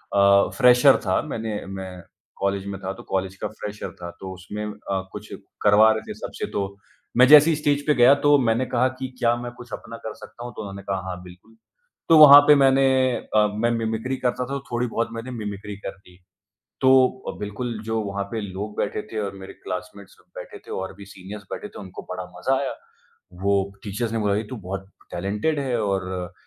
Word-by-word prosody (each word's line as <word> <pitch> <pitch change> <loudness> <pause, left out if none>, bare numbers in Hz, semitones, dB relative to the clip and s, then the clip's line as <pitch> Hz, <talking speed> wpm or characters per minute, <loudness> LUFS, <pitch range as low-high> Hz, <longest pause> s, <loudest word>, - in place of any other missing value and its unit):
अ, 100 0 +5
fresher 125 +1 +6
था, 95 - +2
मैंने 110 -8 -4
मैं 95 -2 -7 0.4
कॉलेज 100 0 -1
में 100 -1 -5
था, 95 0 -3
तो - - -12
कॉलेज 95 0 -2
का - - -3
फ्रेशर 105 -2 -7
था। 85 0 -6
तो 95 -1 -7
उसमें 95 +3 -7
अ, 100 -2 -4
कुछ 105 +1 -9 0.3
करवा 105 +2 +6
रहे 110 0 -1
थे - - -3
सबसे - - -5
तो 100 0 -3 0.4
मैं 125 +1 +7
जैसे 150 +3 +9
ही 160 - +3
स्टेज 145 -1 0
पे 150 - +5
गया 125 +3 +7
तो 145 0 +6
मैंने 120 0 +1
कहा 125 0 +1
कि, 130 0 -5
"क्या 120 0 +3
मैं 120 0 -6
कुछ 120 0 -13
अपना 115 - -7
कर 110 -1 -7
सकता 120 - -12
हूँ?" 120 - -6
तो - - -6
उन्होंने 100 -1 -7
कहा। 95 -1 -2
"हाँ, 90 -1 -6
बिल्कुल।" 90 +5 -16 0.5
तो 165 - +8
वहाँ 145 -2 +11
पे 150 - +8
मैंने 135 -1 +4 0.5
अ, 105 0 +5
मैं 115 +2 +1
मिमिक्री 115 +3 -2
करता 125 0 -1
था - - -13
तो 140 - -2
थोड़ी 120 +1 0
बहुत 115 0 -2
मैंने 115 +3 -6
मिमिक्री 105 -3 -6
कर 100 - -6
दी। 90 -2 -20 0.6
तो 130 - +5 0.4
अ, - - -5
बिल्कुल 110 +3 -4
जो 110 0 -1
वहाँ 100 -1 -3
पे 115 - -2
लोग 105 +1 -6
बैठे 105 - -1
थे 110 - -3
और 100 -1 -4
मेरे 95 - -9
क्लास्मेट्स 95 +2 -7
सब - - -26
बैठे - - -9
थे - - -11
और 95 - -6
भी 100 - -11
सिनियरर्स 100 +2 -10
बैठे - - -5
थे, - - -12
उनको 95 -2 -9
बड़ा 90 0 -4
मज़ा 135 +8 +1
आया। 135 -1 -3 0.7
वो 100 0 +3 0.3
टीचर्स 110 +3 -3
ने 115 - -1
बोला 105 -2 +1
कि, 110 - -2
"तू 130 - -5
बहुत 95 -1 -7 0.2
टैलेंटेड 105 - -1
है।" 130 -4 -1
और 95 -3 -2
105 Hz, 215 wpm, -23 LUFS, 95-120 Hz, 0.7 s, वहाँ